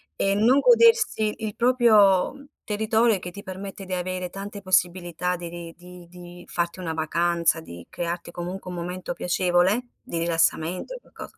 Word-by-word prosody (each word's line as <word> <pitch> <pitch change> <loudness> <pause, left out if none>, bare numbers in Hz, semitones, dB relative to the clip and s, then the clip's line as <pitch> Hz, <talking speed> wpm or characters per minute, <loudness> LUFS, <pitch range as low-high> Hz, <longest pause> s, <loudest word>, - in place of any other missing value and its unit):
E 195 - +1
non 235 +7 +4
godersi 460 - +4
il 210 - -5
proprio 235 0 +4 0.2
territorio 220 +2 +2
e - - -4
che 180 - -7
ti 200 +3 -10
permette 195 +1 -8
di 185 - -5
avere 185 0 -3
tante 200 +2 -8
possibilità 180 -1 0
de 170 -1 -7
di 170 -1 -8
di 180 0 -13
di 175 0 -12
farti 170 +1 -2
una 165 -3 -3
vacanza, 170 +1 +1
di 85 - -11
crearti, 170 0 -4
comunque, 180 +2 -6
un 180 - -6
momento 180 +1 -5
piacevole, 180 +5 +1 0.2
di 170 - -6
rilassamento 165 - 0
e - - -9
qualcosa - - -12
180 Hz, 165 wpm, -24 LUFS, 175-205 Hz, 0.2 s, non